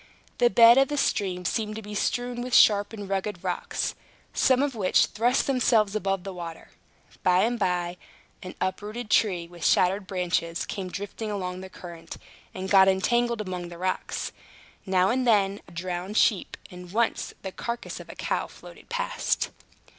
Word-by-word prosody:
The 240 -1 +5
bed 235 +4 +8
of 270 - +4
the 290 - -3
stream 185 -8 0
seemed 215 +2 -1
to 220 - -5
be 210 +1 -8
strewn 245 +3 -1
with 250 0 -1
sharp 205 -1 +6
and 205 -3 -7
rugged 195 -1 -3
rocks, - - -2 0.4
some 260 +1 +3
of 285 -2 -1
which 200 -5 +3
thrust 245 +4 +1
themselves 230 -6 +2
above 195 -3 -1
the 195 -1 -6
water. 170 -2 -8 0.5
By 180 0 +4
and 235 +1 0
by, 180 -2 -1 0.4
an 185 - -8
uprooted 210 +4 -4
tree, 180 -6 +2
with 170 -1 -11
shattered 190 +2 +3
branches, 175 -3 -1
came 190 -3 -5
drifting 205 +3 -5
along 185 -3 -4
the 190 - -9
current, 170 -3 -10 0.3
and 190 0 -5
got 190 -1 +6
entangled 235 +4 +2
among 180 -3 -5
the 170 - -10
rocks. 185 +1 -2 0.6
Now 185 0 +3
and 255 0 0
then, 200 -3 +3
a - - -15
drowned 180 +4 -4
sheep, 205 -6 +2
and 180 -1 -10
once 230 +3 0
the 190 - -4
carcass 235 +4 -5
of - - -11
a - - -9
cow, - - -2
floated - - -14
past. - - -1
195 Hz, 170 wpm, -26 LUFS, 180-230 Hz, 0.6 s, bed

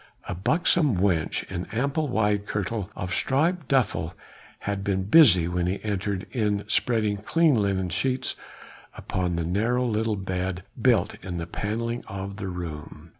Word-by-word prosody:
A - - -2
buxom 140 - +2
wench 90 -4 +1
in 90 -1 -5
ample 140 +7 -1
wide 105 -4 +1
kirtle 105 -1 -2
of 90 0 -4
striped 155 - +1
duffle, 125 -11 +1 0.5
had 100 -1 -3
been 95 -1 0
busy 100 - +6
when 90 0 -1
he 95 +2 -1
entered 100 -2 -2
in 105 -4 0
spreading 105 -2 +1
clean 160 +9 +3
linen 100 -5 +1
sheets 130 +8 0 0.6
upon 90 -2 -2
the 85 -1 -1
narrow 115 +8 +1
little 110 -1 0
bed 95 -1 -3 0.2
built - - +2
in 90 -2 -4
the 85 - -3
panelling 115 +6 -3
of 100 0 -6
the 95 -1 -4
room. 85 -5 -7
100 Hz, 150 wpm, -26 LUFS, 90-120 Hz, 0.6 s, busy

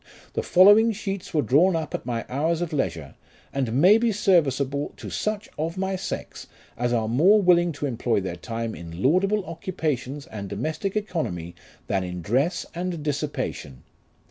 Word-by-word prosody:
The - - -1
following 205 +5 +6
sheets 195 -3 -5
were 150 -4 +1
drawn 165 +7 +4
up 160 -2 -3
at - - -4
my 115 -2 -2
hours 155 +5 0
of 175 -2 -3
leisure, 85 - -2 0.4
and 130 -4 -1
may 195 +8 +7
be 235 0 +2
serviceable 145 -8 +1
to - - -8
such 215 -1 -2
of 165 +3 -2
my 190 0 -1
sex 185 - -6 0.3
as 120 0 -1
are 115 -2 +1
more 170 - +5
willing 175 -3 +4
to 145 - -4
employ 120 -4 0
their 95 -2 -4
time 115 +2 -4
in 85 +1 -8
laudable 195 +7 +2
occupations 150 -5 -3
and 100 -3 -7
domestic 155 - -3
economy, 125 - -3 0.3
than 95 -1 0
in 90 -1 -5
dress 140 - 0
and 175 -2 -4
dissipation. 145 - -3
150 Hz, 165 wpm, -25 LUFS, 120-185 Hz, 0.4 s, may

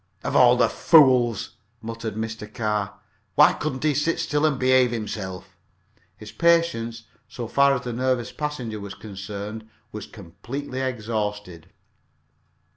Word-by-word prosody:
"Of - - -3
all 125 -1 +7
the 125 - +4
fools!" 130 - +4 0.2
muttered 115 -1 -6
Mr. 110 -1 -5
Carr. 105 -3 -2 0.4
"Why - - +7
couldn't 140 -3 -4
he 155 -1 +3
sit 150 +4 0
still 155 -2 +1
and 145 -4 0
behave 130 -1 +4
himself?" 95 -5 -6 0.6
His 105 -1 -10
patience, 165 -10 +1 0.2
so 120 -2 -6
far 140 +4 +4
as 125 - -3
the 120 - -4
nervous 125 0 -1
passenger 125 -8 -4
was 100 -1 -8
concerned, 105 +2 -7 0.2
was 105 -1 -7
completely 115 +9 -7
exhausted. 105 -8 -4
115 Hz, 130 wpm, -24 LUFS, 105-130 Hz, 0.6 s, all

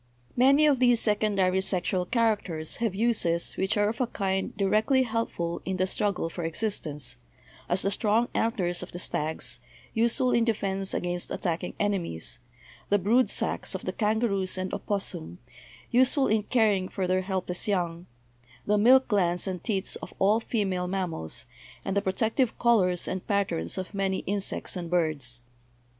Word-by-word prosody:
Many 275 +4 +5
of 285 -4 +3
these 245 -2 +4
secondary 200 -4 +2
sexual 185 -1 -1
characters 205 -9 0
have 225 -5 -1
uses 195 -7 +1
which 195 +4 -1
are 205 0 +3
of 225 +3 -4
a 250 - +1
kind 190 -3 -2
directly 215 +6 +2
helpful 220 -8 -3
in 190 0 -3
the 185 - +2
struggle 195 -2 -1
for 170 +1 -6
existence, 155 - -1 0.5
as 180 +2 +2
the 195 - +1
strong 220 +3 +2
antlers 190 -7 0
of 180 - -9
the - - -5
stags, 160 -3 -1 0.3
useful 235 +3 +2
in 235 - +3
defense 195 -4 0
against 175 0 -2
attacking 175 0 -3
enemies; 175 - 0 0.5
the 205 - +4
brood 225 +7 +2
sacs - - 0
of - - -6
the - - -2
kangaroos 210 -4 0
and 185 0 -3
opossum, 190 - -2 0.5
useful 260 +3 +3
in 220 -2 +2
caring 210 -5 +1
for 190 - -2
their 185 +1 +1
help 190 -1 -3
less 180 +5 -1
young; 175 -3 -1 0.6
the 210 0 +2
milk 260 +5 +6
glands 180 -5 +1
and 185 -2 -4
teats 195 -4 0
of - - -10
all 205 +3 +3
female 195 -6 -1
mam 185 -1 -2
mals, 80 - -4 0.4
and 195 - -2
the 200 - +2
protective 220 +5 0
colors 190 -7 +3
and 185 -1 -4
patterns 195 - -1
of 185 +2 -5
many 195 -1 -1
in 200 +1 -1
sects 195 - -2
and 175 -2 -5
birds. 150 -9 0
195 Hz, 165 wpm, -27 LUFS, 180-220 Hz, 0.6 s, milk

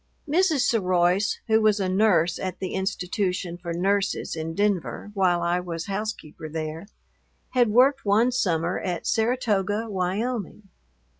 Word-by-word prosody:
Mrs. 320 -2 +2
Seroise, 185 -3 +2
who 220 -1 +3
was 215 -1 +3
a 190 - 0
nurse 185 -3 +2
at 185 -1 -4
the 185 - -4
institution 190 -1 -2
for 175 -1 -6
nurses 195 +3 0
in 160 0 -4
Denver 205 0 -1
while 180 -3 +2
I 175 +1 +1
was 170 -2 -5
housekeeper 195 -6 -5
there, 160 +3 -5 0.6
had 245 -2 +3
worked 265 +5 +4
one 220 +5 +3
summer 175 -7 0
at 175 -3 -4
Saratoga, 220 -3 0
Wyoming. 200 +2 -3
195 Hz, 135 wpm, -25 LUFS, 175-220 Hz, 0.6 s, worked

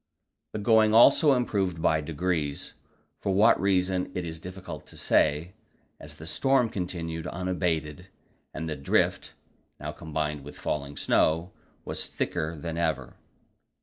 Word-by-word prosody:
The - - -3
going 110 0 +4
also 140 +5 +7
improved 100 -8 0
by 80 -1 +2
degrees, 80 -2 -2 0.5
for 95 - -1
what 105 +4 +5
reason 95 -1 +1
it 90 - -2
is 80 -1 -6
difficult 90 +2 -8
to - - -12
say, 75 +4 +2 0.5
as 75 +1 -10
the 80 - -10
storm 130 +7 +2
continued 85 -4 -4
unabated, 90 -2 -2 0.4
and 80 +1 -5
the 80 - -3
drift 70 -1 0 0.4
now 75 +1 -4
combined 75 -2 -3
with 75 - -10
falling 70 -1 -3
snow 80 +3 +2 0.3
was - - -4
thicker 80 +2 -2
than 85 +1 -4
ever. 80 -3 -2
85 Hz, 135 wpm, -27 LUFS, 75-95 Hz, 0.5 s, also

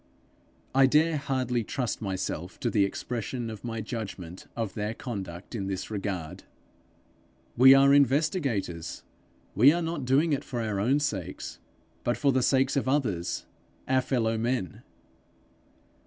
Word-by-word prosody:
I 135 0 +6
dare 155 +3 +3
hardly 130 -4 -1
trust 125 0 -3
myself 95 -3 -4
to 120 - 0
the 100 -2 +3
expression 120 +3 -4
of 110 - -9
my 115 -2 -4
judgment 100 -6 -6
of 110 -4 -3
their 105 0 -3
conduct 95 -7 -6
in 100 -5 -3
this 95 +2 -4
regard. 95 -6 -4 1.1
'We 130 +2 +9
are 140 0 +6
investigators; 135 - +1 0.5
we 125 +8 +7
are 170 +2 0
not 165 -4 -3
doing 145 +5 +3
it 140 - -1
for 125 - -5
our 110 -3 -1
own 130 +8 +2
sakes, 145 0 -4 0.4
but 120 - 0
for 140 -2 +3
the 130 0 +2
sake 130 +1 +2
of 140 - 0
others, 110 - -1 0.4
our 130 0 +3
fellow 115 -4 0
men.' 115 -7 -2
120 Hz, 140 wpm, -28 LUFS, 100-135 Hz, 1.1 s, We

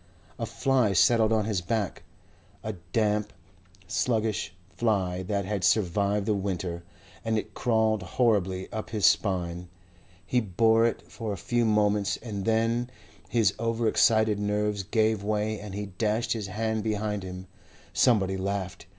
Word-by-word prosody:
A - - -2
fly 130 -6 +1
settled 110 +4 +4
on 110 -2 +2
his 105 -4 -1
back 100 +1 -2 0.6
a 110 - -3 0.2
damp, 105 -1 +1 0.6
sluggish 110 -2 0 0.2
fly 95 -6 0
that 100 +1 -2
had 100 -1 -2
survived 100 +1 +2
the 105 - +2
winter 95 -3 -3 0.4
and 110 0 0
it - - -4
crawled 110 -3 +1
horribly 95 -2 0
up 110 - -4
his 105 -4 0
spine. 90 -3 +1 0.6
He 125 - +2
bore 110 +3 +3
it 115 - -3
for 110 -3 -5
a - - -5
few 120 +6 0
moments, 105 -2 +2
and 105 -4 -6
then 115 +2 +1 0.4
his 105 -1 +3
over 115 0 0
excited 110 -1 +3
nerves 105 0 0
gave 110 +1 +1
way 105 0 -1
and 100 -1 -8
he 105 0 -3
dashed 105 +4 -1
his 110 -4 -4
hand 110 +2 -2
behind 105 -1 -1
him. 90 0 -7 0.5
Somebody 95 -6 +3
laughed. 95 -1 -4
105 Hz, 145 wpm, -27 LUFS, 100-110 Hz, 0.6 s, settled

